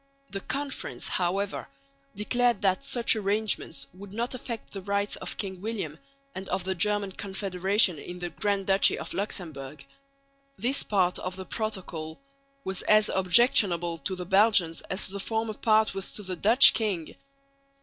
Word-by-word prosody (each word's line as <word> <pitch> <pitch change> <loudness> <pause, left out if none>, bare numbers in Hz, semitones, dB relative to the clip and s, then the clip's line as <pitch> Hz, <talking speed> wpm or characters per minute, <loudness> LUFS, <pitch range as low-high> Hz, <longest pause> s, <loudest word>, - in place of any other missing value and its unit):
The 195 - -3
Conference, 280 +4 -3
however, 195 +1 -1 0.5
declared 240 +2 +1
that 190 +5 +2
such 240 -4 +2
arrangements 205 -8 -1
would 190 +1 -11
not 235 +5 -3
affect 235 -2 -6
the 195 - -5
rights 200 +1 -1
of - - -5
King 190 -3 -5
William 195 -8 -4 0.3
and 190 0 -7
of 190 - -1
the 190 +1 -1
German 205 +2 +1
Confederation 190 -2 +1
in 175 +4 -8
the 175 -1 -5
Grand 200 -2 -1
Duchy 195 0 +4
of - - -6
Luxemburg. 155 -8 -5 0.7
This 250 +7 +1
part 185 -3 +1
of 185 0 -4
the 190 0 -7
protocol 185 -8 -5 0.4
was 190 -4 -2
as 215 0 +4
objectionable 180 -4 +3
to 190 - -1
the 180 -1 -6
Belgians 190 -3 +4
as 190 - -2
the 200 +1 -6
former 220 +2 -2
part 215 -1 +2
was 195 0 -2
to 210 - -6
the 185 -1 -4
Dutch 220 +9 +7
king. 195 -8 -2
195 Hz, 155 wpm, -27 LUFS, 185-215 Hz, 0.7 s, Dutch